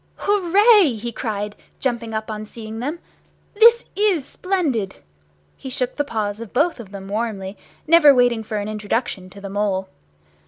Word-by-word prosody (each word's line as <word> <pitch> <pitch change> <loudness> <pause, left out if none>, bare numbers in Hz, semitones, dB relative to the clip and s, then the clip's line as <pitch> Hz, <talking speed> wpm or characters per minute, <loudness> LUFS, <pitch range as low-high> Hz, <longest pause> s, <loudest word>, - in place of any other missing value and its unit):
"Hooray!" 405 - +4
he 235 +2 -5
cried, 210 -3 -4 0.2
jumping 235 -3 -2
up 220 0 -4
on 215 0 -6
seeing 220 0 -8
them, 290 +8 -3 0.6
"this 465 +3 +6
is 390 -9 +1
splendid!" 285 - -2 0.6
He 265 - -8
shook 255 -1 -2
the 290 - 0
paws 215 -6 -3
of 230 -3 -9
both 305 +3 +1
of 220 -5 -9
them 195 -1 -8
warmly, 205 -2 -3 0.3
never 320 -2 +7
waiting 245 -3 +3
for 215 0 -4
an 205 0 -3
introduction 210 -2 -3
to 200 - -13
the 200 - -7
Mole. 195 -1 -1
230 Hz, 160 wpm, -21 LUFS, 210-300 Hz, 0.6 s, never